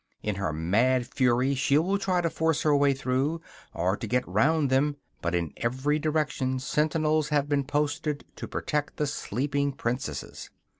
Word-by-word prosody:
In 105 -2 -2
her 95 -5 -1
mad 115 +11 +2
fury, 125 +2 +2
she 140 +1 +2
will 190 +6 +1
try 185 -3 +1
to 170 - 0
force 160 -1 0
her 150 -2 +4
way 140 0 +4
through, 135 +4 0 0.3
or 90 +3 0
to 115 - -6
get 125 +3 0
round 140 - +2
them; 145 +2 +2 0.3
but 85 0 -1
in 85 -3 -2
every 130 +6 0
direction 150 -4 0
sentinels 155 +2 +1
have 145 -1 +1
been 145 -2 +1
posted 150 +1 -1
to - - -6
protect 150 -1 -2
the 150 - +1
sleeping 140 +2 -1
princesses. 125 0 -4
140 Hz, 165 wpm, -27 LUFS, 125-150 Hz, 0.3 s, her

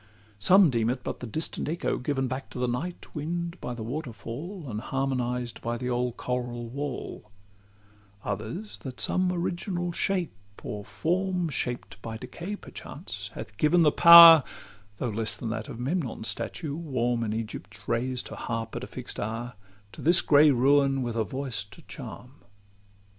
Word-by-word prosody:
Some 180 - +6
deem 115 -2 +1
it 125 +1 -2
but - - -4
the 125 - -6
distant 155 +4 -4
echo 170 +2 -1
given 135 0 -1
Back 130 +2 -5
to - - -9
the 125 0 0
night 155 +9 -4
wind 170 +3 -4
by 125 - -4
the 115 - -6
waterfall, 145 - -6
And 110 -3 -4
harmonised 125 -3 -2
by 120 0 -2
the 125 +1 -3
old 120 0 -1
choral 120 -1 -3
wall: 140 +2 -5
LXIV 100 0 -30
Others, 105 0 -4
that 125 +3 -8
some 185 0 +2
original 175 0 -2
shape, 180 0 0 0.3
or 105 -1 -5
form 180 - -1
Shaped 120 -8 -3
by 110 0 -5
decay 170 - -6
perchance, - - -7
hath 105 - -8
given 165 +6 +4
the 150 - +5
power 170 -2 +11 0.5
(Though 125 - -2
less 110 0 -2
than 115 -3 -4
that 110 - -4
of - - -7
Memnon's 130 -4 -2
statue, 140 +7 -2
warm 125 -7 -1
In 110 - -2
Egypt's 110 0 -6
rays, 125 +2 0
to - - -8
harp 115 -1 -4
at 120 - -4
a - - -5
fix'd 125 -1 -6
hour) 115 +3 -4 0.4
To - - -11
this 170 +3 +5
grey 150 +1 +6
ruin, 135 +1 +3
with 120 -2 -3
a 115 - +1
voice 130 -1 -3
to 100 - -16
charm. 125 +4 -10
125 Hz, 170 wpm, -27 LUFS, 115-155 Hz, 0.5 s, power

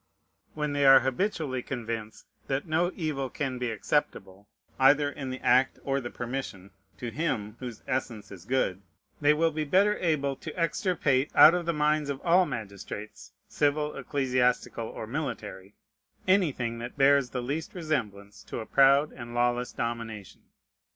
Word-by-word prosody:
When 150 -1 -2
they 145 0 +1
are 135 -1 +8
habitually 135 - -1
convinced 115 -4 -6 0.2
that 135 +3 -1
no 165 +3 +1
evil 150 -6 -2
can 130 -1 -3
be 125 -1 -1
acceptable, 100 -4 -2 0.3
either 145 +2 +5
in 135 -2 -6
the 130 0 -5
act 130 +2 +3
or 135 0 -1
the 120 - -5
permission, 120 -7 -6 0.3
to 120 -2 -5
Him 115 -8 -2
whose 120 -4 -8
essence 115 -6 -3
is 95 -2 -11
good, 105 -6 0 0.4
they 150 +1 +5
will 165 +1 +2
be 155 0 -2
better 195 +7 +3
able 145 -5 0
to 155 +2 -8
extirpate 155 -5 +1
out 160 - +9
of 175 -1 -2
the - - +3
minds 150 -1 +1
of 140 -1 -3
all 175 +1 +4
magistrates, 105 -2 -7 0.2
civil, 150 +1 0
ecclesiastical, 125 -4 0
or - - -7
military, 110 -7 -5 0.5
anything 140 -12 +1
that 120 +3 -7
bears 140 -2 +4
the 125 -1 -4
least 150 +8 -4
resemblance 105 - -3
to - - -6
a 110 - -5
proud 140 +4 +4
and 120 -1 -9
lawless 120 0 +1
domination. 115 -4 -5
135 Hz, 155 wpm, -28 LUFS, 115-150 Hz, 0.5 s, out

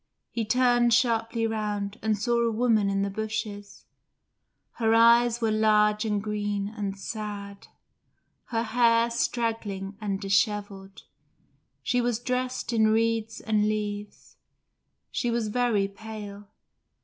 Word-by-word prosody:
He 230 -2 -2
turned 240 0 +3
sharply 230 -1 +1
round, 210 -2 -3
and 220 -1 0
saw 235 +3 +1
a 235 - +2
woman 220 -3 +2
in 195 0 0
the 200 - -1
bushes: 210 -1 -5 0.9
her 225 -1 +3
eyes 235 +1 +5
were 225 -1 +1
large 215 0 +3
and 210 -2 0
green 205 -1 -2
and 200 -2 -4
sad; 200 -1 -6 0.8
her 230 -1 -1
hair 230 0 +3
straggling 225 -5 -2
and 200 -2 -2
dishevelled; 195 -1 -1 0.8
she 245 -1 +1
was 240 -2 0
dressed 250 0 -2
in 220 -1 +4
reeds 225 0 0
and 210 -1 +1
leaves; 210 -1 -5 0.7
she 240 - -1
was 230 -2 -1
very 220 -4 +1
pale. 205 0 -9
215 Hz, 125 wpm, -26 LUFS, 205-230 Hz, 0.9 s, eyes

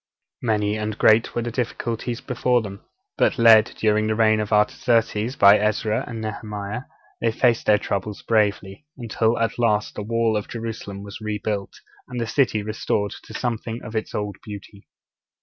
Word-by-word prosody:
Many 105 -2 0
and 110 0 -3
great 110 +1 +4
were 120 - 0
the 120 - -3
difficulties 120 0 -3
before 125 -2 +1
them; 100 -2 -8 0.4
but - - +3
led, 110 -2 +7
during 110 0 +2
the 110 - 0
reign 110 -1 +3
of 105 0 -3
Artaxerxes, 115 +2 +1
by 100 +1 +7
Ezra 105 +1 0
and 115 -2 -6
Nehemiah, 105 +2 -5 0.4
they 115 - +2
faced 120 0 +1
their 105 - +6
troubles 100 0 -4
bravely, 105 +3 0
until 115 -1 0
at 115 +1 -1
last 110 -3 +1
the - - -5
wall 115 +1 0
of 105 - -2
Jerusalem 110 -4 -6
was 100 +1 -9
rebuilt, 105 -2 -3 0.3
and 125 -1 -5
the 115 - -1
city 115 -3 +1
restored 105 -1 -2
to - - -11
something 115 -1 -3
of 110 - -8
its 110 - -3
old 105 -1 -3
beauty. 100 -1 -10
110 Hz, 165 wpm, -23 LUFS, 105-115 Hz, 0.4 s, led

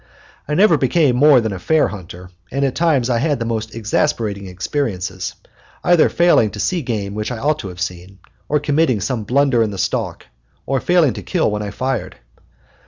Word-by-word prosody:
I 150 - -1
never 180 -5 +4
became 140 -1 +2
more 140 -1 +6
than 110 -3 -2
a 95 - -6
fair 160 - +2
hunter, 90 -2 -10 0.2
and 140 +1 0
at 135 - -1
times 155 -8 +2
I 120 -2 +1
had 140 -4 0
most 110 -1 -3
exasperating 105 -3 -1
experiences, 95 -2 -3 0.5
either 175 -2 +4
failing 170 -10 +3
to 105 - -9
see 180 - 0
game 105 -6 -3
which 105 +3 -3
I 120 - -4
ought 150 +6 0
to 100 - -6
have 90 -1 -9
seen, 90 0 -5 0.3
or 150 - +2
committing 145 -4 +1
some 110 +3 -2
blunder 135 0 +2
in 110 - +1
the 100 - -6
stalk, - - -2 0.4
or 135 0 0
failing 170 -4 +3
to 105 - -7
kill 90 +3 0
when 105 0 -2
I 105 - -4
fired. 130 +5 -3
120 Hz, 190 wpm, -19 LUFS, 100-145 Hz, 0.5 s, more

